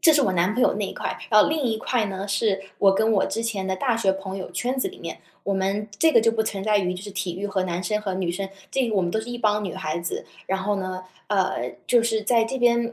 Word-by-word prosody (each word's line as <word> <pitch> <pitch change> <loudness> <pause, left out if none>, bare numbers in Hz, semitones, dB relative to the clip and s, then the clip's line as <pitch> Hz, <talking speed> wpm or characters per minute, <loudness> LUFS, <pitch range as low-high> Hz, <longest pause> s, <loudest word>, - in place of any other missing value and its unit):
这 320 - +7
是 295 - +4
我 195 - +2
男 180 +4 +2
朋 250 - +2
友 - - +4
那 205 -1 -1
一 - - -6
块， - - -4
然 210 -1 +7
后 - - +2
另 310 0 0
一 225 -3 +1
块 230 +1 0
呢， 195 +1 -5
是 200 -1 +1 0.2
我 195 -1 +5
跟 220 +3 +2
我 200 -3 +3
之 225 - -2
前 210 -5 -2
的 190 - 0
大 240 +4 +1
学 195 -4 +2
朋 195 0 -6
友 190 - -5
圈 255 +2 -1
子 - - +1
里 - - -7
面， 165 -1 -6 0.2
我 200 - -1
们 195 +2 -1
这 320 -1 +5
个 - - +7
就 230 0 +4
不 220 -1 0
存 200 -3 -3
在 210 0 +3
于 180 -2 0
就 180 - -7
是 205 - -7
体 185 -3 -3
育 195 - -5
和 200 -2 0
男 175 0 -2
生 210 +4 0
和 195 -3 -3
女 185 -2 -1
生， 195 +2 -3 0.2
这 265 -3 +1
个 220 - -1
我 195 - +3
们 175 - 0
都 220 - 0
是 220 - -9
一 245 - -4
帮 210 -2 +1
女 185 - -4
孩 155 +2 -2
子。 170 0 -4 0.2
然 190 0 -1
后 205 +1 0
呢 185 -1 -4 0.2
呃， 190 - 0
就 240 -2 +5
是 225 -2 +1
在 230 +1 +3
这 250 +4 -3
边 235 -1 +2
205 Hz, 320 characters per minute, -24 LUFS, 190-225 Hz, 0.2 s, 这